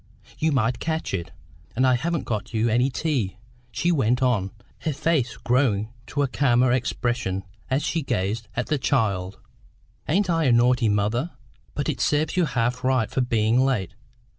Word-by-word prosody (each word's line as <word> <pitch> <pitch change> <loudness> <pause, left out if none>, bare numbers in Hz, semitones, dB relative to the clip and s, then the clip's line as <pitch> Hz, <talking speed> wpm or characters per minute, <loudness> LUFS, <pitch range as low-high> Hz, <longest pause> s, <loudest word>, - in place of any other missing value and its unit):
You 160 0 +2
might 125 -3 +1
catch 160 -7 -2
it. 85 -3 -3 0.5
And 130 +3 +3
I 130 - +4
haven't 165 +6 -1
got 110 0 -4
you 110 +2 +2
any 125 +4 +2
tea," 130 -10 -1 0.3
she 175 - 0
went 125 -5 +2
on, 110 -7 +1 0.3
her 155 - -2
face 150 -4 0
growing 120 -5 +1 0.2
to 145 - -1
a - - +1
calmer 125 -2 +3
expression 120 -5 -1 0.3
as 135 +3 +1
she 165 +1 -1
gazed 110 -2 -2
at 120 - -1
the 150 -3 -1
child 100 -8 0 0.7
"Ain't 190 +6 +2
I 165 -2 +1
a 130 - +4
naughty 120 0 +4
mother? 105 +9 0 0.5
But 145 - -2
it 150 - -2
serves 150 +3 +1
you 180 -2 +3
half 125 -2 -1
right 130 -4 +1
for 130 - 0
being 115 -1 +2
late. 105 -10 0
125 Hz, 170 wpm, -24 LUFS, 110-145 Hz, 0.7 s, I